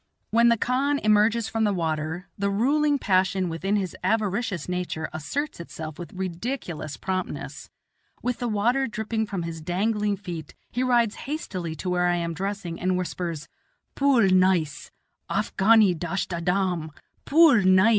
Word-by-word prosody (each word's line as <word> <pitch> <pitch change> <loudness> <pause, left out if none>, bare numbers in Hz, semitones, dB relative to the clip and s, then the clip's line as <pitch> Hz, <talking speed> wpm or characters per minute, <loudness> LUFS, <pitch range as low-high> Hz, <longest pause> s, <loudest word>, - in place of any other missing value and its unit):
When 235 +2 +5
the 235 - +4
khan 270 +5 +1
emerges 215 +1 +3
from 225 0 -1
the 205 -2 +2
water, 160 +1 -2
the 200 0 -1
ruling 285 +8 +2
passion 190 -4 +1
within 190 +5 -1
his 190 -4 -2
avaricious 210 -3 0
nature 180 -3 -3
asserts 220 - -3
itself 160 -2 -7
with 175 - -7
ridiculous 180 - -4
promptness. 185 +4 -4 0.5
With 245 -1 -1
the 245 - -1
water 240 +5 +1
dripping 220 0 -2
from 195 -4 -3
his 165 -1 -5
dangling 205 +4 0
feet, 175 -6 -7 0.2
he 245 - -1
rides 240 -4 +3 0.2
hastily 185 - -4
to 180 - -4
where 180 0 +2
I 175 - +2
am 170 -1 -2
dressing 190 -1 -4
and 185 0 +1
whispers, 170 -3 -4 0.5
"Pool 275 -5 +3
neis; 185 -5 +2 0.4
Afghani 215 -1 +4
dasht 175 +3 -3
adam, 180 -1 0 0.4
pool 300 -7 +6
neis." 185 +3 +5
190 Hz, 145 wpm, -25 LUFS, 175-225 Hz, 0.5 s, pool